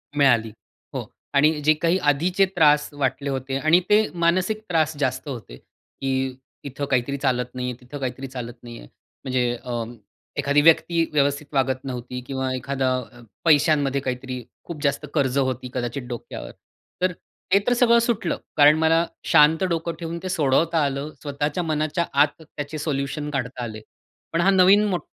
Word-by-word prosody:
मिळाली, 120 -6 +3 0.4
हो - - -3 0.3
आणि 150 +2 +4
जे 155 +2 +5
काही 170 +4 +1
आधीचे 180 +7 +2
त्रास 150 -2 +4
वाटले 140 0 -1
होते 135 0 -3
आणि 155 +5 +4
ते 215 +1 +5 0.2
मानसिक 185 +5 +1
त्रास 155 -2 +1
जास्त 130 +1 -1
होते 110 - -8
की 130 - -4 0.3
इथं 140 +1 -4
काहीतरी 130 +2 +1
चालत 125 -2 0
नाही 125 0 -3
आहे, 125 - -6
तिथं 135 +4 -9
काहीतरी 130 +1 -4
चालत 125 -2 -6
नाही 120 -1 -9
आहे. - - -13 0.4
म्हणजे 125 -2 0
अ, 120 -2 -3 0.5
एखादी 145 +1 +3
व्यक्ती 165 +1 +4
व्यवस्थित 145 0 +1
वागत 130 -1 +1
नव्हती 125 -1 -5
किंवा 130 -1 -2
एखादा 130 +1 -1 0.6
पैशांमध्ये 145 -3 +3
काहीतरी 125 -1 -4 0.2
खूप 155 -4 -8
जास्त 140 - 0
कर्ज 140 -3 +1
होती 130 -2 -1
कदाचित 125 +2 -3
डोक्यावर. 120 -2 -7 0.5
तर 185 0 +2 0.4
ते 200 - +7
तर 245 - +4
सगळं 235 -1 +5
सुटलं, 230 -7 0 0.2
कारण 150 +1 +7
मला 165 +1 +3 0.2
शांत 160 +4 +5
डोकं 170 -2 -1
ठेवून 165 0 -4
ते 185 - -3
सोडवता 160 0 +2
आलं. 140 +2 -3
स्वतःच्या 145 +4 -2
मनाच्या 155 +2 -1 0.2
आत 150 +2 +1
त्याचे 150 -1 -7
सोल्युशन 145 0 -3
काढता 125 -2 -3
आले. 110 -2 -6 0.5
पण 165 - +2
हा 195 - +4
नवीन 195 +2 +6
मोठ 180 -3 -1
145 Hz, 160 wpm, -23 LUFS, 130-165 Hz, 0.6 s, ते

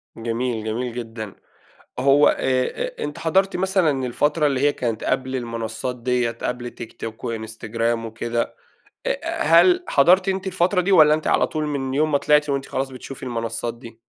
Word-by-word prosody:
جميل، 115 0 -2
جميل 120 +2 -3
جدًا، 115 -4 -6 0.6
هو 140 +3 +5
آآ، - - +3 0.6
آآ - - -7
أنتِ 150 - -5
حضَرتِ 190 +4 +1
مثلًا 180 -8 +1
الفترة 150 +5 +1
اللي 135 -3 0
هي 145 +1 +3
كانت 115 -5 -3
قبْل 130 0 -1
المنصّات 115 0 -4
دِيّة، 125 -1 0
قبل 120 +1 -4
تيك 115 -1 -11
توك 115 -1 -7
وإنستجرام 115 +1 -2
وكده 115 +1 -3 0.5
آآ، - - -2
هل 355 - +5
حضَرتِ 180 +7 +4
أنتِ 190 0 -2
الفترة 185 0 +2
دي 190 +3 0
والّا 155 -5 +7
أنتِ 155 0 -2
على - - +3
طول 155 -1 -3
من 135 -3 -2
يوم 155 +2 +1
ما 145 - +4
طلِعتِ 150 +1 +3
وأنت 140 -1 -1
خلاص 135 +1 -3
بتشوفي 135 +1 -9
المنصّات 115 -1 -3
دي؟ 115 -1 -13
130 Hz, 170 wpm, -22 LUFS, 115-150 Hz, 0.6 s, والّا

